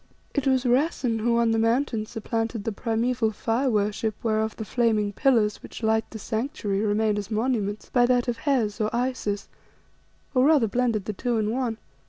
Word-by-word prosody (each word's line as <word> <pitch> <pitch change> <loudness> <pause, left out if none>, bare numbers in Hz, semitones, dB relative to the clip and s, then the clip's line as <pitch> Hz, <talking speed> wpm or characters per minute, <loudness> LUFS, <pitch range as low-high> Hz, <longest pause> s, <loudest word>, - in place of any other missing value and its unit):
"It 285 -2 0
was 260 -1 +2
Rassen 250 -2 +1
who 235 +1 +2
on 235 -1 +3
the 225 - +2
Mountain 230 -1 +1
supplanted 225 -1 -3
the 225 - -2
primeval 230 +2 0
fire 230 +5 0
worship 210 0 0
whereof 220 -1 0
the 220 - -6
flaming 215 -3 +1
pillars 225 -4 +2
which - - -10
light 220 0 +2
its 220 -3 -8
Sanctuary 220 -4 -2
remain 210 0 +1
as 205 - -6
monuments, 215 -2 -1
by 245 -1 +4
that 245 0 +2
of 240 -1 -1
Hes, 235 -5 0
or 215 - +1
Isis, 240 -5 -2 0.9
or 255 -1 +4
rather 295 -5 +5
blended 230 -2 0
the 215 - -3
two 240 +3 -1
in 215 0 0
one. 240 -2 -1
225 Hz, 180 wpm, -25 LUFS, 215-250 Hz, 0.9 s, rather